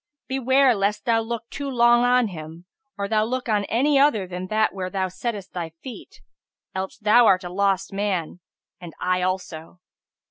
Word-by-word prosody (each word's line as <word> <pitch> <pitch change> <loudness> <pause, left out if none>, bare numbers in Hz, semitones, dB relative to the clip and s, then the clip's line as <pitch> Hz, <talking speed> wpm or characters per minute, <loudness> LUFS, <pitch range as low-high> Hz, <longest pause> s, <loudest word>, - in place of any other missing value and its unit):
Beware 265 0 +3
lest 210 +2 -1
thou 230 -2 +3
look 230 +1 -4
too 280 0 -4
long 240 -1 +4
on 245 -2 +3
him, 165 0 -9 0.3
or 200 0 -2
thou 215 0 +2
look 250 +3 -3
on 210 -2 +1
any 275 +6 +2
other 250 -9 +3
than 180 0 -6
that 215 +2 +1
where 185 -1 -4
thou 190 -1 -2
settest 200 0 -5
thy 170 -3 -5
feet: 255 - -10 0.5
else 190 0 -4
thou 220 +2 +5
art 185 0 +4
a 175 - -6
lost 195 0 0
man, 190 -4 -2 0.4
and 175 -3 -10
I 180 0 0
also." 180 -2 -4
205 Hz, 175 wpm, -23 LUFS, 185-240 Hz, 0.5 s, thou